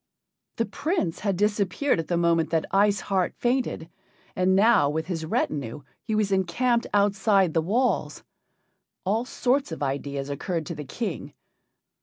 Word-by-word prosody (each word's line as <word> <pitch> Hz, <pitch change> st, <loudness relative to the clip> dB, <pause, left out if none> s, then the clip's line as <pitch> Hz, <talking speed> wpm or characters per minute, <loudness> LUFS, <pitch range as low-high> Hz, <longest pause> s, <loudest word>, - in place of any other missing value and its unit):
The 230 Hz, -, 0 dB
Prince 280 Hz, -, -2 dB
had 200 Hz, -4 st, -1 dB
disappeared 210 Hz, +4 st, +1 dB
at 165 Hz, -, -3 dB
the 175 Hz, -, 0 dB
moment 170 Hz, -1 st, +2 dB
that 165 Hz, -1 st, 0 dB
Ice 200 Hz, 0 st, +3 dB
Heart 190 Hz, -2 st, -1 dB
fainted, 245 Hz, -9 st, -1 dB, 0.5 s
and 185 Hz, +1 st, +2 dB
now 200 Hz, -7 st, +5 dB
with 160 Hz, +2 st, -2 dB
his 165 Hz, -3 st, -4 dB
retinue 140 Hz, -3 st, -2 dB, 0.2 s
he 220 Hz, -, -2 dB
was 210 Hz, -2 st, +1 dB
encamped 230 Hz, +6 st, +1 dB
outside 200 Hz, -3 st, +3 dB
the 165 Hz, -, +2 dB
walls. 235 Hz, +10 st, 0 dB, 0.8 s
All 220 Hz, +5 st, +1 dB
sorts 260 Hz, -2 st, 0 dB
of 160 Hz, -, -4 dB
ideas 140 Hz, 0 st, -3 dB
occurred 165 Hz, +3 st, -3 dB
to 170 Hz, -, -5 dB
the 150 Hz, -2 st, -7 dB
King. 195 Hz, -, -5 dB
190 Hz, 150 wpm, -25 LUFS, 160-215 Hz, 0.8 s, now